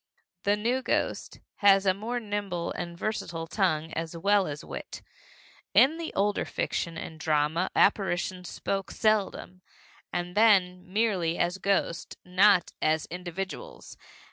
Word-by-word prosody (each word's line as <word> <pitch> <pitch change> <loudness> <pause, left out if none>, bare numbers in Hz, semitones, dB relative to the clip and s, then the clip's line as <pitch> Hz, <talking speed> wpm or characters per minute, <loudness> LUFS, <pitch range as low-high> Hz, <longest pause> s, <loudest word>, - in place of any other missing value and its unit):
The 205 +1 +4
new 240 +5 0
ghost - - -2 0.2
has 195 -1 +5
a 190 - +4
more 225 +5 -3
nimble 205 -6 -3
and 170 -1 -5
versatile 175 -5 -3
tongue 160 -2 0
as 165 +1 -4
well 200 +2 +3
as 145 0 -6
wit. - - -8 0.7
In 310 +5 +6
the 330 - -4
older 205 +1 +1
fiction 170 -1 -3
and 160 -1 -7
drama 155 +3 +1
apparitions 185 -2 +1
spoke 195 -1 -3
seldom, 205 -4 0 0.5
and 175 0 -3
then 185 -5 +3
merely 190 -6 +1
as 175 +2 0
ghosts, 195 -4 -1
not 185 +1 +4
as 155 0 +1
individuals. 185 - -6
185 Hz, 130 wpm, -28 LUFS, 170-205 Hz, 0.7 s, In